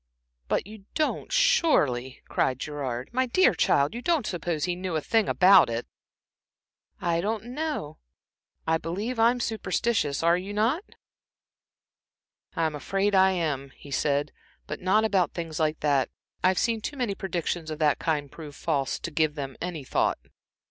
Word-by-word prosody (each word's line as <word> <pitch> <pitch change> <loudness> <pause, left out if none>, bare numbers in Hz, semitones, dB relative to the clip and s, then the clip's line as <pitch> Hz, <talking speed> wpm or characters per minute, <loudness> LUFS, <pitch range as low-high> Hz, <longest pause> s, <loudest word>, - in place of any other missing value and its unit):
"But - - 0
you 210 -1 -12
don't 310 -1 -1
surely," 150 - +2
cried 130 -1 0
Gerard, 130 -4 -4
"my 260 +1 +1
dear 370 +10 +4
child, 140 +6 +2
you 240 - -5
don't 320 -4 +1
suppose 175 -5 -2
he 180 -1 0
knew 180 -2 -4
a - - +2
thing 220 +5 +1
about 190 -5 +6
it?" 115 +1 -3 1.1
"I 170 -2 0
don't 215 +3 -2
know. 250 - -4 0.7
I 160 0 +2
believe 205 +9 -3
I'm 235 +2 +4
superstitious 220 -9 0
are 170 +1 +4
not 215 - 0
you?" - - -22 1.6
"I'm 160 -2 0
afraid 195 +8 -1
I 190 0 +5
am," 150 -6 -2
he 145 - -13
said, 140 +1 0 0.3
"but 150 - -6
not 210 +4 +3
about 195 -5 +1
things 165 -3 -4
like 155 -1 0
that. 140 -3 +2 0.3
I've 185 0 +3
seen 230 -2 +1
too 285 - -5
many 245 -6 0
predictions 175 -3 -3
of 155 - -4
the 150 -2 +3
kind 145 -4 -1
prove 150 -3 -10
false, 140 -5 -1
to 170 - -6
give 155 -1 +1
them 135 -3 -5
a 170 -4 -4
thought." - - +1
175 Hz, 160 wpm, -27 LUFS, 150-220 Hz, 1.6 s, about